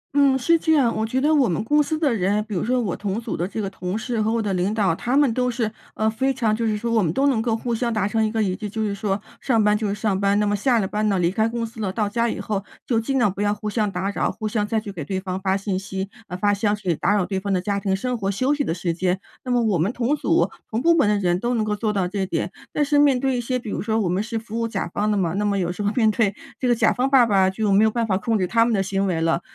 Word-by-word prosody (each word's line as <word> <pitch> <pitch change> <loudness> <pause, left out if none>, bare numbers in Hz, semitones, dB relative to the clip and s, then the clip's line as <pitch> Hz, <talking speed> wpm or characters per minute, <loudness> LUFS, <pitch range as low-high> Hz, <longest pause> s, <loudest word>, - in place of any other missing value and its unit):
嗯， 280 -2 +4
是 330 +6 +3
这 320 - +2
样。 260 -7 +3
我 220 - -1
觉 255 +4 0
得 300 +4 +2
我 275 -6 +3
们 175 +4 -1
公 295 +6 +3
司 310 +2 -1
的 300 -5 +1
人， 205 0 +1
比 215 - -6
如 175 - -1
说 250 +2 +1
我 205 -7 -1
同 200 +1 -3
组 230 - -4
的 175 - -2
这 210 - -6
个 205 - -2
同 185 0 -4
事 230 0 -2
和 215 +1 +1
我 230 - +1
的 210 -3 -1
领 185 +2 0
导， 210 -5 +1
他 245 +10 -1
们 285 -5 +4
都 250 +1 0
是， 230 -3 -1 0.2
呃 215 - 0
非 250 +5 +1
常 230 -5 0
就 230 +1 -1
是 215 -1 0
说 230 +2 -3
我 225 -1 +3
们 165 -5 +1
都 270 - +1
能 265 -6 +2
够 225 -1 0
互 240 +1 -3
相 235 +1 -1
达 215 -3 0
成 220 +1 +1
一 215 - 0
个 220 -1 0
一 185 -2 -1
致。 210 0 -5
就 220 +2 -3
是 205 -2 -1
说， 200 0 -2 0.2
上 230 -5 +2
班 210 0 +4
就 215 0 -1
是 200 - -1
上 205 -2 -1
班， 200 +1 +2
那 210 - +2
么 205 0 +1
下 240 +4 +2
了 200 -4 0
班 210 +2 0
呢， 195 - +1
离 175 -1 +2
开 220 +3 +1
公 230 0 -2
司 225 0 -9
了， 195 -3 -1
到 210 +1 -1
家 235 +3 0
以 - - -4
后 200 -2 -2 0.2
就 235 -3 +1
尽 270 +4 -1
量 235 -7 +2
不 200 - -5
要 205 0 +2
互 210 +1 -7
相 210 -2 0
打 195 +2 -2
扰、 - - -1
互 215 - -5
相 210 -1 -1
再 220 +1 0
去 210 -1 -7
给 175 -5 -6
对 190 +6 -3
方 185 0 -4
发 190 0 +1
信 195 -1 -2
息， 190 0 -4 0.2
呃 180 - -5
发 205 +2 +2
消 205 +1 +1
息， 195 -4 -1
打 205 - +1
扰 200 -3 +1
对 190 +1 -2
方 200 +1 -3
的 185 - +2
家 200 +2 -1
庭 195 -1 0
生 250 +6 -2
活、 200 -4 -2
休 255 +8 +1
息 290 0 0
的 - - -2
时 175 -1 -2
间。 180 +2 0 0.2
那 255 - -4
么 245 -1 +2
我 205 -6 +1
们 180 +7 +1
同 250 +4 0
组、 - - +2 0.2
同 220 - -1
部 335 - +5
门 290 -10 +3
的 210 - +2
人 180 -3 +1
都 240 +4 -1
能 220 -2 0
够 210 -1 -1
做 215 +1 -1
到 195 -3 0
这 195 +1 -2
点。 - - -2 0.2
但 295 - +1
是 290 +1 +2
面 280 -3 +4
对 265 0 0
一 245 - -1
些 255 +2 -1
比 245 - -9
如 - - -2
说 220 +2 0
我 205 - 0
们 180 +3 0
是 230 +1 -3
服 225 0 -5
务 230 - 0
甲 200 -5 -3
方 210 +1 0
的 210 - +1
嘛， 175 -4 0
那 200 +3 -1
么 205 -1 +1
有 175 -2 -1
时 180 - -6
候 205 0 +1
面 220 -3 +4
对 205 -2 +1 0.2
这 255 - 0
个 240 - +4
甲 - - +3
方 255 +2 0
爸 265 -3 +6
爸， 195 -4 +3
就 205 +2 -1
没 200 +2 +5
有 220 - +5
办 230 +1 -1
法 200 -4 0
控 220 +4 0
制 185 - +1
他 230 +5 +3
们 230 -1 +1
的 195 - +1
行 195 +1 -1
为 175 -3 0
了。 165 +1 +1
215 Hz, 355 characters per minute, -22 LUFS, 195-235 Hz, 0.2 s, 爸